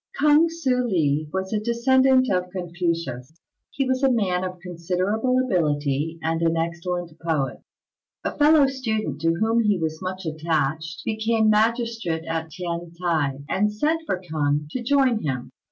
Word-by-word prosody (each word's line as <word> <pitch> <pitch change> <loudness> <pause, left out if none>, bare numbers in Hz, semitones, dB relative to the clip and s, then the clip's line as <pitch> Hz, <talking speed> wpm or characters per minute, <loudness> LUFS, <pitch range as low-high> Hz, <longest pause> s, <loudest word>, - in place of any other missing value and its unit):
K'ung 300 +2 +5
Hsüeh 265 -7 0
li 155 -5 +1
was 190 +2 -3
a 215 - +1
descendant 255 +3 +3
of 180 0 0
Confucius. 170 -6 -3 0.3
He 275 - -1
was 260 0 0
a 270 -1 +4
man 190 -6 +1
of 185 -1 -5
considerable 185 +8 -1
ability, 150 - 0
and 165 +1 0
an 165 0 +2
excellent 170 +1 -3
poet. 155 -5 -1 0.6
A - - -3
fellow 295 -1 +5
student, 230 - -2
to 165 0 +2
whom 225 +5 +2
he 210 -3 +2
was 160 -2 -3
much 185 0 -5
attached, 160 +1 -2
became 220 0 +2
magistrate 225 -6 0
at 165 0 -3
T'ien 170 0 -5
t'ai, 150 -6 0
and 210 +5 +1
sent 305 +10 0
for 190 - -1
K'ung 150 -4 -1
to 255 - -3
join 255 -2 +2
him. 130 -4 -3
180 Hz, 155 wpm, -24 LUFS, 165-230 Hz, 0.6 s, K'ung